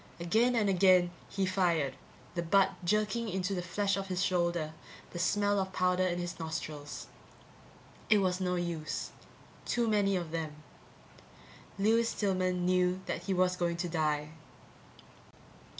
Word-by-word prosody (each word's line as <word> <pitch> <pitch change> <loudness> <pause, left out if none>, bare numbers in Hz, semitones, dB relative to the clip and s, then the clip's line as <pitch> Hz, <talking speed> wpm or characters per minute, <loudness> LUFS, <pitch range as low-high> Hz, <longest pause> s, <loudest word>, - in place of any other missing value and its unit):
Again 225 +9 +2
and 215 -3 +2
again 185 -2 +5 0.2
he 195 -1 0
fired, 175 -7 +1 0.4
the 170 - -1
butt 190 +3 +3
jerking 215 +4 0
into 190 +1 -1
the 180 - -1
flesh 195 +3 0
of 195 0 -4
his 185 0 -1
shoulder, 170 -4 0 0.4
the 175 - -6
smell 205 +2 +2
of 190 -1 -3
powder 180 0 +2
in 175 -1 -1
his 175 0 -4
nostrils. 155 -2 -5 1.0
It 215 - +6
was 185 -2 +1
no 180 -1 0
use. 170 -3 -3 0.5
Too 240 -1 0
many 205 -2 +2
of 170 -3 -3
them. 160 -2 -3 1.2
Lewis 225 +3 +3
Stillman 185 -4 0
knew 180 0 +2
that - - -4
he 195 - 0
was 180 0 +2
going 170 -1 -1
to 175 0 -2
die. 150 -2 0
180 Hz, 145 wpm, -31 LUFS, 170-195 Hz, 1.2 s, It